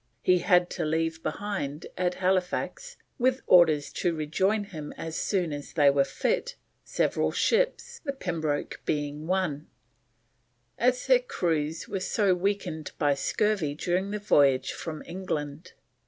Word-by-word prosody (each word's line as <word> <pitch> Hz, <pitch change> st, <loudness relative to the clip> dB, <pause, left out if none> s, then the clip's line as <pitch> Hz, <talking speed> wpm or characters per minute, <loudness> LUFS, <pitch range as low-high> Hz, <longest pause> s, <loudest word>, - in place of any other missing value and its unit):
He 180 Hz, -1 st, +4 dB
had 180 Hz, 0 st, +4 dB
to 175 Hz, -, -3 dB
leave 160 Hz, +1 st, -1 dB
behind 165 Hz, -9 st, -4 dB
at 180 Hz, 0 st, 0 dB
Halifax, 190 Hz, -, -1 dB, 0.2 s
with 255 Hz, +1 st, +2 dB
orders 160 Hz, -5 st, +5 dB
to 175 Hz, -2 st, -1 dB
rejoin 190 Hz, +8 st, 0 dB
him 160 Hz, -7 st, -8 dB
as 160 Hz, -1 st, -5 dB
soon 180 Hz, -6 st, 0 dB
as 145 Hz, 0 st, -7 dB
they 145 Hz, -4 st, +5 dB
were 140 Hz, 0 st, +3 dB
fit, -, -, -1 dB, 0.3 s
several -, -, 0 dB
ships, 480 Hz, 0 st, 0 dB
the 285 Hz, -, -1 dB
Pembroke 165 Hz, -, -3 dB
being 150 Hz, +1 st, -2 dB
one, 180 Hz, -5 st, -1 dB, 1.1 s
as 250 Hz, +1 st, +2 dB
their -, -, +5 dB
crews 165 Hz, -, -2 dB
were 195 Hz, -, -3 dB
so 195 Hz, +1 st, +2 dB
weakened 180 Hz, -4 st, -2 dB
by 145 Hz, -2 st, +3 dB
scurvy 170 Hz, 0 st, 0 dB
during 180 Hz, +5 st, -1 dB
the 210 Hz, -, -2 dB
voyage 140 Hz, -10 st, +3 dB
from 160 Hz, -2 st, -6 dB
England. 160 Hz, -3 st, -5 dB
175 Hz, 140 wpm, -27 LUFS, 150-200 Hz, 1.1 s, orders